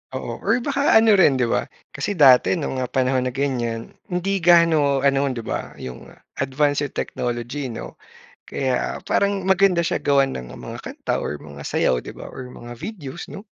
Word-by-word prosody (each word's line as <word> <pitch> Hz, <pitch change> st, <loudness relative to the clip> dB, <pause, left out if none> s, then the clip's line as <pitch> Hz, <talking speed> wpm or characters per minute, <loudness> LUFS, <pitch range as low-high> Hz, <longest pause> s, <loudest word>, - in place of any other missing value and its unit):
Oo -, -, -5 dB
or 245 Hz, -, +1 dB
baka 280 Hz, +1 st, +2 dB
ano 220 Hz, -2 st, +6 dB
rin 145 Hz, -7 st, +5 dB
'di 130 Hz, -, +1 dB
ba, -, -, 0 dB, 0.2 s
kasi 205 Hz, -, -3 dB
dati 135 Hz, -1 st, +6 dB
nung, 140 Hz, -5 st, -3 dB
ah, 130 Hz, -, -1 dB
panahon 130 Hz, 0 st, +1 dB
na 125 Hz, -, -4 dB
ganyan, 120 Hz, -5 st, -2 dB, 0.2 s
hindi 190 Hz, +2 st, -1 dB
gaano 160 Hz, -5 st, +4 dB
ano, 140 Hz, 0 st, +3 dB
'di 125 Hz, -4 st, -3 dB
ba, -, -, -5 dB
yung 65 Hz, -1 st, -9 dB, 0.3 s
advanced 145 Hz, +1 st, +1 dB
yung -, -, -23 dB
technology 120 Hz, +3 st, -3 dB
'no, 115 Hz, -2 st, -8 dB, 0.4 s
kaya 130 Hz, -2 st, -2 dB
parang 200 Hz, -1 st, +1 dB
maganda 190 Hz, -2 st, +4 dB
siya 170 Hz, +1 st, 0 dB
gawan 140 Hz, -1 st, +3 dB
ng 60 Hz, -1 st, -7 dB
mga -, -, -8 dB
kanta -, -, -3 dB
or 75 Hz, -, -4 dB
mga 70 Hz, -1 st, -11 dB
sayaw 60 Hz, -3 st, +1 dB
'di -, -, -7 dB
ba -, -, -10 dB
or 125 Hz, -1 st, -9 dB
mga 120 Hz, 0 st, -10 dB
videos 170 Hz, -, -7 dB
'no. 200 Hz, -, -9 dB
140 Hz, 180 wpm, -22 LUFS, 125-175 Hz, 0.4 s, ano